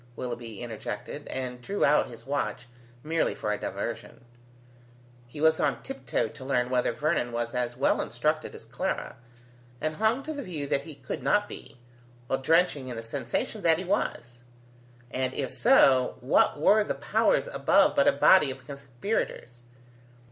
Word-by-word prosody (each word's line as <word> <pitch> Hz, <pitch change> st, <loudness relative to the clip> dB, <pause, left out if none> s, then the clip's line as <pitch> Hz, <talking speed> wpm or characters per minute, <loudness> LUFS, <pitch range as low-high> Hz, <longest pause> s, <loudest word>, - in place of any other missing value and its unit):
Willoughby 120 Hz, -3 st, -6 dB
interjected, 115 Hz, +4 st, -6 dB
and 125 Hz, -1 st, -5 dB
drew 200 Hz, +11 st, 0 dB
out 150 Hz, +1 st, +4 dB
his 115 Hz, -1 st, -12 dB
watch, 135 Hz, -3 st, -3 dB, 0.4 s
merely 165 Hz, +1 st, 0 dB
for 105 Hz, -1 st, -2 dB
a 105 Hz, -, -4 dB
diversion; -, -, -5 dB, 1.0 s
he 135 Hz, +5 st, -10 dB
was 160 Hz, +1 st, +4 dB
on -, -, 0 dB
tiptoe 270 Hz, -, -2 dB
to 130 Hz, -, -11 dB
learn 125 Hz, -2 st, 0 dB
whether 125 Hz, -1 st, +2 dB
Vernon 150 Hz, -5 st, -1 dB
was 120 Hz, 0 st, -3 dB
as 120 Hz, -1 st, -2 dB
well 135 Hz, -, +2 dB
instructed -, -, -1 dB
as -, -, -12 dB
Clara, -, -, -3 dB, 0.6 s
and 155 Hz, +3 st, -2 dB
hung 220 Hz, +5 st, +1 dB
to 310 Hz, +2 st, -4 dB
the 285 Hz, -, -5 dB
view 165 Hz, -, -4 dB
that 140 Hz, 0 st, -1 dB
he 160 Hz, -3 st, -9 dB
could 130 Hz, -2 st, -6 dB
not 205 Hz, 0 st, +2 dB
be, 135 Hz, -1 st, -10 dB, 0.5 s
while 135 Hz, +2 st, -1 dB
drenching 160 Hz, -2 st, +2 dB
in 125 Hz, -, -5 dB
the 115 Hz, -, -6 dB
sensation 140 Hz, -, -3 dB
that 165 Hz, -3 st, +4 dB
he 185 Hz, -, -4 dB
was: 120 Hz, -, -2 dB, 0.7 s
and 130 Hz, 0 st, -2 dB
if 135 Hz, -3 st, -2 dB
so, 135 Hz, -, +4 dB
what 130 Hz, +3 st, +3 dB
were 210 Hz, +7 st, +5 dB
the -, -, -3 dB
Powers -, -, +2 dB
above -, -, +3 dB
but -, -, +4 dB
a -, -, +7 dB
body 155 Hz, -7 st, +5 dB
of 130 Hz, 0 st, -8 dB
conspirators? 130 Hz, -, -4 dB
135 Hz, 165 wpm, -27 LUFS, 120-165 Hz, 1.0 s, a